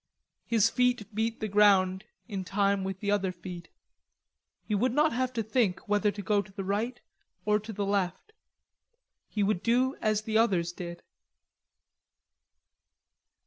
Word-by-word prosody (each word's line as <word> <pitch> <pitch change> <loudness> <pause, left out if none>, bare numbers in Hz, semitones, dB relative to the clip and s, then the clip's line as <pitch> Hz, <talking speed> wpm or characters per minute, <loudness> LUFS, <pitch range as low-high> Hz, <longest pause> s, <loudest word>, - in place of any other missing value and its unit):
His 225 -2 +4
feet 250 -4 +1
beat 225 +2 -1
the 215 - -1
ground 195 -2 +4 0.2
in 200 -4 -4
time 200 +1 +1
with 190 0 -4
the 205 -1 0
other 195 -2 +1
feet. 175 -1 -9 0.9
He 215 - -4
would 235 +5 +2
not 300 +1 +3
have 255 +1 0
to 230 -2 -1
think 215 -4 +1
whether 205 0 +2
to 205 0 -7
go 205 0 +2
to 200 - -14
the 195 0 -5
right 215 +6 -2 0.5
or 210 0 +3
to 215 +2 -8
the 205 -1 -2
left. 200 - -2 1.0
He 210 - 0
would 195 -3 +1
do 255 +3 +2
as 215 0 +1
the 220 0 +1
others 180 -7 +2
did. 170 -1 -8
205 Hz, 150 wpm, -29 LUFS, 195-225 Hz, 1.0 s, His